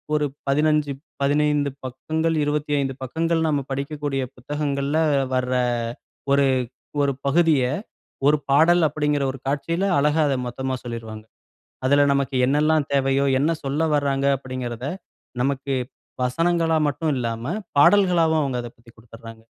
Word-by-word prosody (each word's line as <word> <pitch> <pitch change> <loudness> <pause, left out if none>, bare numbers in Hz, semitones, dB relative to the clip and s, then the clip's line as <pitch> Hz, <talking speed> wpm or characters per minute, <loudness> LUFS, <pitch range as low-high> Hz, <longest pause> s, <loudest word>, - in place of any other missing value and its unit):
ஒரு, 150 -1 +1 0.2
15 150 +1 +2 0.3
15 145 0 +2 0.2
பக்கங்கள், 160 +6 -2
25 145 -2 -1
பக்கங்கள் 165 +5 -1
நம்ம 145 -2 +1
படிக்கக்கூடிய 140 0 -3
புத்தகங்கள்ல 145 +2 -2 0.4
வர, 130 0 0 0.8
1 140 0 +4 0.6
1 140 -1 +2
பகுதிய, 155 -2 +3 0.6
1 150 - +5
பாடல் 165 +5 +5
அப்படீங்கிற 150 -1 0
1 135 - -10
காட்சியில 165 +7 -1
அழகா 150 +2 +3
அத 135 - +1
மொத்தமா 130 +2 -3
சொல்லிருவாங்க. 115 -2 -7 0.6
அதுல, 145 +1 +4
"நமக்கு 140 -1 -1
என்னெல்லாம் 150 +1 +2
தேவையோ, 135 0 +2
என்ன 150 +4 +2
சொல்ல 145 +4 0
வராங்க" 140 -1 0
அப்படீங்குறத 130 -1 -5 0.6
நமக்கு 135 0 -1 0.5
வசனங்களா 165 +5 +1
மட்டும் 155 +2 -2
இல்லாம, 120 - -3 0.2
பாடல்களாவும் 170 -3 +4
அவங்க 130 -3 -2
அதப் 120 - -10
பத்தி 115 0 -19
குடுத்துறாங்க. 115 0 -13
140 Hz, 120 wpm, -23 LUFS, 130-155 Hz, 0.8 s, 1